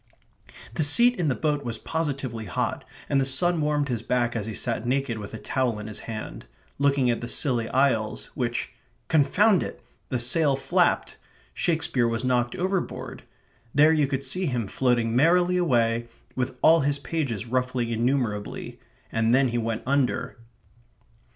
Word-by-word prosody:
The 155 - 0
seat 240 +11 +6
in 170 - +1
the 130 - +1
boat 150 -2 -1
was 120 -2 -3
positively 135 -7 -3
hot, 90 - -2 0.2
and 140 -1 +2
the - - +2
sun 165 +6 +1
warmed 150 -1 0
his 120 -4 -2
back 120 0 0
as 110 -2 -3
he 110 - -4
sat 115 -2 -2
naked 130 -3 -1
with 100 - -8
a - - -5
towel 125 0 -1
in 105 - -7
his 110 -1 -4
hand, 110 -2 -7 0.3
looking 140 -3 +3
at 120 - -3
the 120 - -5
Scilly 120 -3 0
Isles 125 -5 0
which 120 -2 -3 0.4
confound 180 +7 +4
it! - - -6 0.3
the 130 - 0
sail 140 +4 +3
flapped. 135 - +1 0.4
Shakespeare 160 -8 +1
was 115 +2 -1
knocked 120 -1 +1
overboard. 185 +1 -3 0.5
There 150 +3 +6
you 150 -3 +2
could 135 0 -3
see 180 +7 -1
him 125 -5 -1
floating 120 +1 0
merrily 175 +6 +4
away, 120 -8 +1 0.3
with 125 0 -3
all 165 +1 +7
his 145 -1 +1
pages 140 - -3
ruffling 125 0 -1
innumerably; 115 -3 -2 0.3
and 115 +1 +2
then 130 -1 +3
he 120 0 -1
went 115 -1 -3
under. 130 -2 0
130 Hz, 165 wpm, -25 LUFS, 115-145 Hz, 0.5 s, all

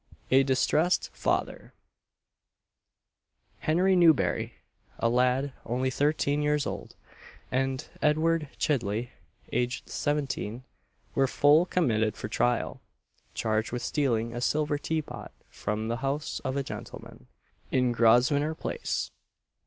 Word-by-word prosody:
A 135 +1 +7
DISTRESSED 135 +6 +2
FATHER. - - -2 1.9
Henry 185 +4 +3
Newberry, 165 -5 +3 0.4
a - - +1
lad, 125 +3 +2
only 130 +3 -1
thirteen 145 +1 +1
years 150 0 +1
old, - - -6 0.6
and 135 +2 -1
Edward 155 0 +2
Chidley, 120 -4 -1 0.4
aged 125 +1 -1
seventeen, 130 -5 -2 0.5
were 135 -1 +3
full 150 +6 +4
committed 110 - +1
for - - -5
trial, 120 +2 0 0.5
charged 110 0 0
with 120 0 -3
stealing 115 -6 0
a 120 - -4
silver 150 +2 +1
tea 160 +1 -1
pot - - -9 0.2
from 105 +1 -3
the 115 +1 -1
house 135 +3 -2
of 130 +1 -2
a 140 - 0
gentleman, 60 - -9 0.4
in 125 -2 +2
Grosvenor 125 +7 +3
Place. 480 - -3
135 Hz, 115 wpm, -28 LUFS, 120-150 Hz, 1.9 s, A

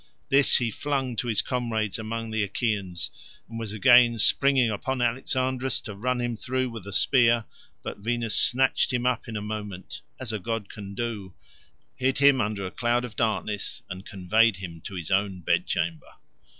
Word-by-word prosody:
This 140 0 +6
he 120 -2 -1
flung 135 0 -2
to 120 - -2
his 110 -3 +1
comrades 115 -4 -2
among 115 +1 -4
the 110 -1 0
Achaeans, 100 -4 -2 0.4
and 115 0 -7
was 110 -3 -5
again 120 +1 +5
springing 130 +1 +4
upon 130 +5 -3
Alexandrus 130 +1 0
to 105 - -8
run 125 +5 -1
him 120 -1 -2
through 130 +2 -2
with 110 -4 -9
a - - -6
spear, 120 0 +3 0.4
but - - -6
Venus 115 +1 -1
snatched 135 +2 +3
him 125 -1 -1
up 125 -2 0
in 110 -2 -4
a 105 - -5
moment 105 -3 -6 0.2
(as 125 -4 -4
a 110 - -2
god 115 0 -4
can 100 -2 -9
do), 105 -5 -4 0.6
hid 130 +1 0
him 140 -2 +5
under 105 -2 -2
a 95 - -5
cloud 120 0 0
of 115 - -10
darkness, 105 -2 -2
and 95 +1 -7
conveyed 105 +3 +2
him 85 -3 -8
to 100 - -7
his 85 -2 -5
own 95 -1 0
bedchamber. 85 -1 -1
115 Hz, 175 wpm, -26 LUFS, 100-125 Hz, 0.6 s, This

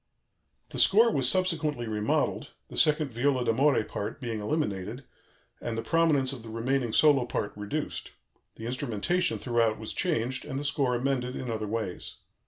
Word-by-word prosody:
The - - -3
score 225 +4 +6
was 130 -8 +2
subsequently 160 -8 0
remodelled, 105 -1 -1 0.2
the - - -9
second 150 -2 +3
viola 125 +1 +1
d'amore 130 +2 +3
part 105 - -5
being 115 -5 -3
eliminated 110 - -2 0.6
and 115 -1 -3
the 115 - -2
prominence 145 -2 +2
of 125 - -7
the 115 - -10
remaining 120 +2 0
solo 140 +1 +5
part 105 - -2
reduced; 105 +9 -4 0.5
the 110 - -8
instrumentation 130 - 0
throughout 115 -3 +1
was 110 0 -5
changed, 130 -8 -1
and 135 -2 -4
the - - -4
score 140 -3 +1
amended 125 0 -1
in 125 -2 -4
other 110 -1 -3
ways. 105 -4 -3
125 Hz, 160 wpm, -28 LUFS, 115-145 Hz, 0.6 s, score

